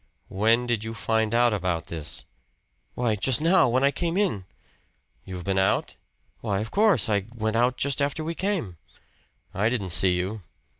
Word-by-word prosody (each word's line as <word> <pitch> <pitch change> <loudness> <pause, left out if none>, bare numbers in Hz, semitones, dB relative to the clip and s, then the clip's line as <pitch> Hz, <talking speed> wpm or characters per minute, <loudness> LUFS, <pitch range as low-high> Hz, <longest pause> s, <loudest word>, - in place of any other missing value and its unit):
"When 115 +5 +2
did 120 -3 -1
you 115 0 -6
find 110 -1 0
out 120 -1 +3
about 90 -5 -2
this?" 80 -3 -5 0.7
"Why, 120 -3 0
just 115 +4 +1
now. 165 -2 +4
When 130 +3 +1
I 140 - +4
came 170 +4 -2
in." 175 - 0 0.8
"You've 90 -2 -7
been 95 0 0
out?" 95 - 0 0.4
"Why 100 -4 -2
of 110 +2 -5
course. 210 - +3
I 100 -2 0
went 110 -1 -2
out 125 +2 +2
just 140 +1 -1
after 145 +3 -1
we 165 +2 -3
came." 175 - -2 0.8
"I 105 +4 +1
didn't 110 -6 -3
see 90 +2 +5
you." 95 +4 -3
110 Hz, 170 wpm, -25 LUFS, 95-135 Hz, 0.8 s, see